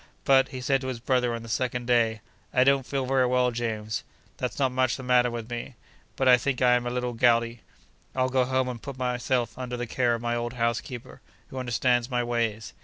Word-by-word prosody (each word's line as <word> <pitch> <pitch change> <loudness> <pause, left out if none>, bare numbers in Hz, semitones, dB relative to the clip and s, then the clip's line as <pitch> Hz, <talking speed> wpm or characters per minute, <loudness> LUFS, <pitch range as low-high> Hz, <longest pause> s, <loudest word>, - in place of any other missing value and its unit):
But, 135 -1 +5
he 130 -2 -7
said 135 +1 +1
to 130 - -5
his 130 -3 -4
brother 125 -1 +1
on 115 - -7
the - - -9
second 125 +1 -2
day, 115 -3 +2 0.3
'I 125 - +6
don't 135 -1 +3
feel 135 -2 -1
very 130 -1 +2
well, 125 0 +2
James. 110 -2 -3 0.3
There's - - -3
not 135 -2 +2
much 130 0 +1
the 135 - -8
matter 125 -1 +3
with 115 -2 -5
me; 120 +2 -5 0.4
but 135 - 0
I 125 -1 +8
think 130 +1 -2
I 125 -1 +5
am 120 0 +1
a - - 0
little 125 0 -2
gouty. 115 -1 +2 0.5
I'll 130 0 +2
go 130 0 +2
home 130 0 0
and 120 -2 -5
put 140 -2 -7
myself 125 -2 -1
under 125 -1 -4
the 120 - -3
care 120 0 +1
of 115 - -6
my 120 0 0
old 120 +1 -3
housekeeper, 120 0 -3 0.3
who 130 - -6
understands 120 0 +1
my 125 -2 0
ways. 115 -3 -2
125 Hz, 225 wpm, -26 LUFS, 120-130 Hz, 0.5 s, I